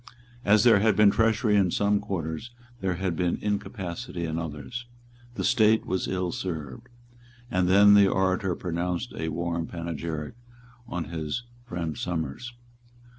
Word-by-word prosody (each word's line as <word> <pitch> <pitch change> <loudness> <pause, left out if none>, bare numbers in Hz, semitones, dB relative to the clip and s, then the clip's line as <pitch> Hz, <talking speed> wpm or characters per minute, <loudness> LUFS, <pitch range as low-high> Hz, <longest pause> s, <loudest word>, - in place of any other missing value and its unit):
As 105 +1 +5
there 115 -4 +6
had 110 0 +3
been 105 -1 +6
treachery 110 -1 +2
in 95 -3 +4
some 100 +2 +2
quarters, 95 0 -4 0.3
there 95 -4 -1
had 90 -1 -2
been 90 0 0
incapacity 100 -2 -4
in 80 0 -2
others. 80 - -6 0.5
The - - -3
State 110 -3 +4
was 95 0 -1
ill 90 -2 -1
served. 85 - -5 0.6
And 90 0 +2
then 100 +2 +7
the 100 -1 +7
orator 95 -1 +1
pronounced 90 +5 -3
a 80 - -3
warm 85 +1 -2
panegyric 85 -2 -5 0.5
on 90 -6 -3
his 80 +8 -3 0.2
friend 85 -5 -3
Somers. 85 - -3
90 Hz, 140 wpm, -27 LUFS, 85-105 Hz, 0.6 s, then